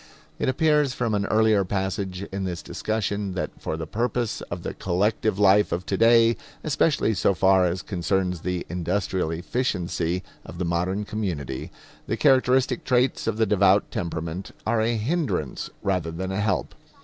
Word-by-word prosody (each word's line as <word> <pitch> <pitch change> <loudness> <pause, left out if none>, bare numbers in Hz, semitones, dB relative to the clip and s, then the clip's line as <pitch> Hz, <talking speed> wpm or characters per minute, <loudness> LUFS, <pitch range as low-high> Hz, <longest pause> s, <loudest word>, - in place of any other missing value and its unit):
It - - +1
appears 150 -2 +2
from 115 -3 -1
an 100 -1 0
earlier 110 -2 +3
passage 95 0 -3
in 95 0 -3
this 90 -4 -4
discussion 105 -3 -2
that 90 - -2
for 80 - -3
the 80 - -4
purpose 120 +5 -1
of - - -5
the - - -4
collective 100 +3 0
life 105 0 +4
of 90 +2 -2
today, 115 +4 +4 0.3
especially 150 -5 +2
so 100 0 +2
far 95 +1 +4
as 90 +1 -3
concerns 90 -1 -1
the 90 0 -2
industrial 90 0 -1
efficiency 90 -2 -1 0.2
of 80 - -10
the 90 - -2
modern 90 +4 -1
community, 85 -12 -4 0.4
the 115 - -1
characteristic 130 -2 +3
traits 125 -1 +1
of 110 -2 0
the 110 - +3
devout 100 -1 +3
temperament 85 +2 -4 0.2
are 110 0 +2
a 115 +1 +1
hindrance 110 - -2
rather 90 -4 0
than 95 +3 -4
a 95 +2 -1
help. 110 - -1
100 Hz, 160 wpm, -25 LUFS, 90-110 Hz, 0.4 s, life